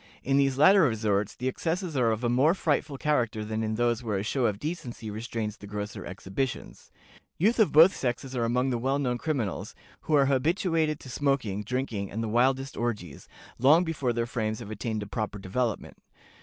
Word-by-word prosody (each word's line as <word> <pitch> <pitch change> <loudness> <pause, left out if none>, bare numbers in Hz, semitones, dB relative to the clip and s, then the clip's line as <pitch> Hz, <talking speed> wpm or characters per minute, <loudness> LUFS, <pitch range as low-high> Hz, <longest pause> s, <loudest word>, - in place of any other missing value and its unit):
In 135 +1 +2
these 135 -1 +2
latter 190 +7 +7
resorts 105 - +1
the 125 - -3
excesses 165 +5 -2
are 125 -3 +3
of 110 +2 -1
a - - +2
more 135 +8 +3
frightful 145 -4 -1
character 120 -8 0
than 110 +1 -3
in 110 0 -1
those 120 0 +1
where 110 -4 -2
a 95 - -2
show 120 +3 +1
of 105 - -2
decency 120 -6 -5
restrains 110 0 -4
the 100 - -11
grosser 105 -1 -5
exhibitions; 95 +8 -5 0.5
youth 220 +8 +2
of 215 - +4
both 165 +6 +7
sexes 130 +1 -3
are 120 - 0
among 125 +3 +1
the 120 - -1
well 135 +3 0
known 125 -4 -1
criminals, 130 - -3 0.3
who 155 - +2
are 140 -1 +5
habituated 155 +2 +1
to 130 - -10
smoking, 130 -8 0
drinking, 110 -3 -3
and 110 +2 -4
the - - -2
wildest 130 +4 +1
orgies, 105 -11 -4 0.3
long 150 +8 +6
before 150 -7 -1
their 115 0 -1
frames 110 -2 -2
have 110 -3 -8
attained 110 0 -3
a - - -7
proper 105 0 -4
development. 105 +3 -3
120 Hz, 195 wpm, -27 LUFS, 110-140 Hz, 0.5 s, latter